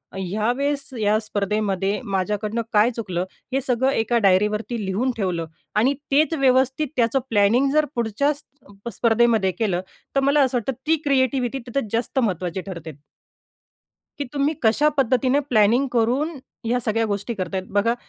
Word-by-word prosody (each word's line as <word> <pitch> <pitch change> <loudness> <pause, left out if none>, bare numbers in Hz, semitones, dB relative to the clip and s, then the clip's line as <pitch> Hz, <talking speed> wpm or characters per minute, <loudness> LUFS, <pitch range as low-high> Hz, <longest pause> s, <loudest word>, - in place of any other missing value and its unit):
ह्या 200 +4 -1
वेळेस 280 0 -1
या 210 0 +3
स्पर्धेमध्ये 205 -2 -1
माझ्याकडनं 210 +3 -1
काय 210 +2 +5
चुकलं, 185 -6 -2 0.3
हे 270 - +1
सगळं 260 +1 +1
एका 235 -1 +1
डायरीवरती 210 +4 +1
लिहून 215 +8 0
ठेवलं 180 -5 -1 0.3
आणि 245 +7 +3 0.2
तेच 305 +4 +3
व्यवस्थित 265 +2 +2
त्याचं 235 +2 +2
प्लॅनिंग 225 +6 +3
जर 305 0 +4
पुढच्या 235 +6 +1 0.6
स्पर्धेमध्ये 225 -2 +2
केलं, 190 -6 0 0.3
तर - - +4
मला 280 +2 +3
असं 260 -2 +2
वाटतं 240 +2 -2 0.2
ती 320 - +5
क्रिएटिविटी 260 -1 +1
तिथे 240 -2 -2
जास्त 235 +4 -1
महत्त्वाची 185 -5 -1
ठरते. 170 -4 -7 1.3
की 285 - -2
तुम्ही 285 +2 +1
कशा 235 +7 +4
पद्धतीने 260 +1 +2
प्लॅनिंग 235 +5 +4
करून 250 +8 +1 0.3
ह्या 245 +2 +1
सगळ्या 225 -1 0
गोष्टी 205 +3 -3
करत 190 -3 -4
आहेत. 185 - -2
बघा 210 +3 +2
230 Hz, 145 wpm, -22 LUFS, 205-265 Hz, 1.3 s, काय